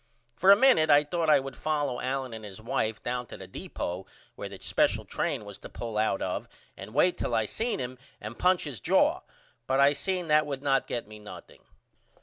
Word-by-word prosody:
For 185 +11 +6
a - - +10
minute 245 -10 +5
I 145 0 +7
thought 160 +2 -1
I 150 - +7
would 135 -1 -7
follow 145 -5 -1
Allen 130 -1 -2
and 110 -1 -7
his 100 -2 -8
wife 110 -1 -2
down 125 0 -3
to - - -9
the 95 - -9
deepo 90 0 -5 0.3
where - - -7
the - - -9
special - - +1
train - - -2
was - - -9
to - - -10
pull 115 -2 -6
out 105 -2 +1
of - - -3 0.3
and 105 +5 -10
wait 175 +5 +3
till - - -1
I 110 - +2
see 225 - -2
him 125 0 -5 0.2
and 110 +2 -8
punch 180 0 +3
his 140 -8 -4
jaw - - +3 0.5
but 135 +1 +2
I 140 +1 +6
seen 180 +3 -2
that 150 0 +4
would 140 -1 -4
not 135 -1 +2
get 120 - -3
me 105 0 -11
nothing. 105 - -12
135 Hz, 215 wpm, -28 LUFS, 110-155 Hz, 0.5 s, a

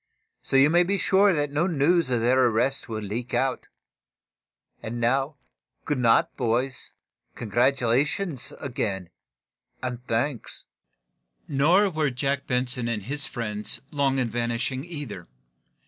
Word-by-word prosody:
So - - -2
you 135 +3 +6
may 175 +1 +5
be 195 +3 +1
sure 195 +1 +4
that 145 -4 0
no 150 +5 +1
news 165 -1 +2
of 120 -2 +1
their 130 +3 +4
arrest 125 +4 0
will 110 -1 -4
leak 115 +5 -4
out. 135 -1 0 1.1
And 120 +2 -5
now, 135 +5 +1 0.5
good 145 -3 -1
night, 115 -2 +3
boys. 125 +1 -1 0.4
Congratulations, 130 - 0
again, 100 -9 -3 0.7
and 125 -1 -4
thanks!" 120 +2 -2 0.8
Nor 175 +9 +3
were 155 -3 +1
Jack 140 +2 -2
Benson 125 -1 0
and 110 -4 -2
his 140 +5 -2
friends 105 -2 -3
long 140 -3 +1
in 130 -2 +1
vanishing, 120 +3 -2
either. 145 - -6
130 Hz, 130 wpm, -25 LUFS, 120-145 Hz, 1.1 s, you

